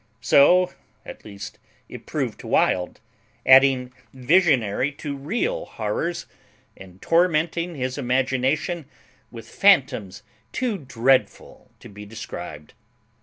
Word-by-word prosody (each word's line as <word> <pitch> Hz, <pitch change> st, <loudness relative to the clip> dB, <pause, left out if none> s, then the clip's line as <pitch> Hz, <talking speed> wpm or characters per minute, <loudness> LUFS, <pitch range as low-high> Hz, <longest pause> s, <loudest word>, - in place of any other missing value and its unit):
So 175 Hz, +9 st, +4 dB, 0.3 s
at -, -, -11 dB
least 100 Hz, -1 st, -10 dB, 0.3 s
it -, -, -12 dB
proved -, -, -3 dB
to -, -, -10 dB
Wild, 90 Hz, -1 st, 0 dB, 0.5 s
adding 130 Hz, -1 st, +5 dB, 0.2 s
visionary 130 Hz, -, +2 dB
to 145 Hz, 0 st, -6 dB
real 240 Hz, -, -3 dB
horrors, 170 Hz, 0 st, -4 dB, 0.5 s
and 95 Hz, -1 st, -15 dB
tormenting 170 Hz, 0 st, +1 dB
his 130 Hz, 0 st, -4 dB
imagination 135 Hz, +6 st, -1 dB, 0.4 s
with 115 Hz, -2 st, -11 dB
phantoms 130 Hz, -, +2 dB, 0.3 s
too 240 Hz, -6 st, -2 dB
dreadful 130 Hz, -1 st, -1 dB
to -, -, -12 dB
be 105 Hz, 0 st, -12 dB
described. 90 Hz, -8 st, -9 dB
135 Hz, 105 wpm, -23 LUFS, 115-170 Hz, 0.5 s, adding